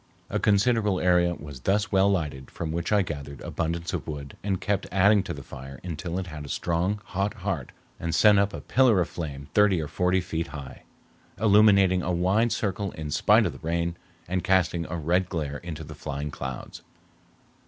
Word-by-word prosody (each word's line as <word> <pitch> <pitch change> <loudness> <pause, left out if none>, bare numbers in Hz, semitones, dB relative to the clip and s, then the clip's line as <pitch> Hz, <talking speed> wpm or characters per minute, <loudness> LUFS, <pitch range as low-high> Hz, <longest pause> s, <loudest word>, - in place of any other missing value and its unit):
A - - 0
considerable 105 -1 +2
area 90 -1 +3
was 70 -4 -9
thus 100 - 0
well 95 0 +4
lighted, 75 -8 -2
from 80 -2 -5
which 85 +3 -2
I 105 -2 +4
gathered 70 -4 -6
abundance 85 0 -3
of - - -3
wood, 70 -2 -6
and 95 -2 -1
kept 100 -1 -1
adding 100 +2 +5
to - - -6
the - - -6
fire 65 0 -10
until 85 0 -4
it 95 - -2
had 80 -4 -7
a 70 - -9
strong, 90 +7 0
hot 100 +3 -2
heart 95 - -3 0.3
and 85 0 -2
sent 105 -2 +6
up 100 +1 +2
a - - -7
pillar 125 -7 +4
of 90 - 0
flame 70 -4 -6
thirty 105 -4 +4
or 75 - -3
forty 90 +4 +1
feet 85 -2 -3
high, 70 -2 -9 0.6
illuminating 100 -3 +5
a 90 - -2
wide 95 +7 +2
circle 100 -1 -1
in 75 -1 -6
spite - - +4
of - - 0
the - - -12
rain, 85 +1 -1 0.3
and 90 0 -1
casting 90 -3 +2
a 85 - -3
red 90 +3 +1
glare 75 -5 -3
into 80 -2 -7
the - - -9
flying 70 +1 -5
clouds. 65 -3 -6
90 Hz, 195 wpm, -26 LUFS, 80-100 Hz, 0.6 s, sent